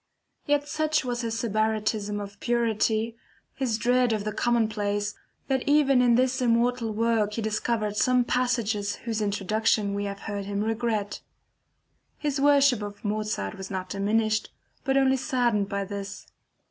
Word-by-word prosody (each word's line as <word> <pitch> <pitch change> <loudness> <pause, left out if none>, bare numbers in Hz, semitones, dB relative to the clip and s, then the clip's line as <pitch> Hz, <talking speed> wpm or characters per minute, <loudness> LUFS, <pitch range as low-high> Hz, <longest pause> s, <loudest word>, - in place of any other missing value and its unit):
Yet 290 0 +2
such 310 -1 0
was 245 -1 -2
his 230 -1 -2
Sybaritism 215 -1 0
of 200 0 -8
purity, 230 -1 0 0.4
his 255 -5 -1
dread 245 0 +2
of 210 -2 -1
the 215 - -2
commonplace, 210 -3 0 0.3
that 265 -1 +1
even 280 -3 +4
in 240 -1 +4
this 255 +1 +2
immortal 235 -1 +2
work 220 -1 +1
he 225 - -2
discovered 215 -1 -1
some 250 +1 +3
passages 225 -5 0
whose 225 -2 -1
introduction 210 0 +1
we 200 0 -2
have 200 0 -5
heard 205 -2 -4
him 200 +1 -2
regret. 220 -2 -2 1.0
His 290 -2 -2
worship 280 -4 +5
for 205 -1 -5
Mozart 210 - -2
was 190 - -6
not 185 -1 -4
diminished 215 +2 0 0.3
but 270 -1 +1
only 265 0 +4
saddened 240 -6 0
by 200 0 -2
this. 200 0 -6
220 Hz, 145 wpm, -26 LUFS, 205-245 Hz, 1.0 s, worship